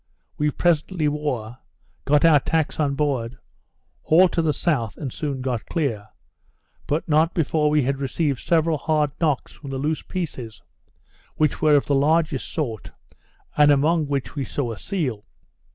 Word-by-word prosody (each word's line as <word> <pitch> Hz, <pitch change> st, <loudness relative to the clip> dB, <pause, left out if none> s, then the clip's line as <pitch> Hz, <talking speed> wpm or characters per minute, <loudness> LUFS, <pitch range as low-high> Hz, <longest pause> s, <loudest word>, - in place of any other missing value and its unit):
We 150 Hz, 0 st, +1 dB
presently 165 Hz, +1 st, +1 dB
wore; 130 Hz, -6 st, -3 dB, 0.5 s
got 145 Hz, +2 st, +4 dB
our 155 Hz, -3 st, +6 dB
tacks 160 Hz, +2 st, -1 dB
on 140 Hz, -2 st, +1 dB
board; 135 Hz, -4 st, -1 dB, 0.6 s
hauled 175 Hz, +3 st, +5 dB
to 165 Hz, -, +1 dB
the 160 Hz, -2 st, +1 dB
south, 135 Hz, -, -1 dB
and 135 Hz, -5 st, -5 dB
soon 140 Hz, -4 st, -3 dB
got 125 Hz, -4 st, -3 dB
clear; 120 Hz, -, -2 dB, 0.8 s
but 150 Hz, +3 st, -1 dB
not 160 Hz, +2 st, +2 dB
before 155 Hz, -1 st, +1 dB
we 150 Hz, -1 st, +2 dB
had 135 Hz, +2 st, -1 dB
received 140 Hz, 0 st, -1 dB
several 165 Hz, -2 st, +1 dB
hard 150 Hz, -2 st, +1 dB
knocks 150 Hz, -5 st, 0 dB
from 140 Hz, -, -11 dB
the 135 Hz, -, -3 dB
loose 150 Hz, +3 st, -1 dB
pieces, 135 Hz, -, -6 dB, 0.7 s
which 155 Hz, -2 st, 0 dB
were 155 Hz, -1 st, +5 dB
of 145 Hz, -, +3 dB
the 145 Hz, -, 0 dB
largest 155 Hz, 0 st, +1 dB
sort, 120 Hz, -10 st, -4 dB, 0.7 s
and 150 Hz, -1 st, +5 dB
among 150 Hz, +2 st, +3 dB
which 140 Hz, -2 st, -3 dB
we 140 Hz, -, -2 dB
saw 130 Hz, -2 st, -3 dB
a 110 Hz, -, -7 dB
seal. 135 Hz, -, -3 dB
150 Hz, 160 wpm, -23 LUFS, 135-160 Hz, 0.8 s, our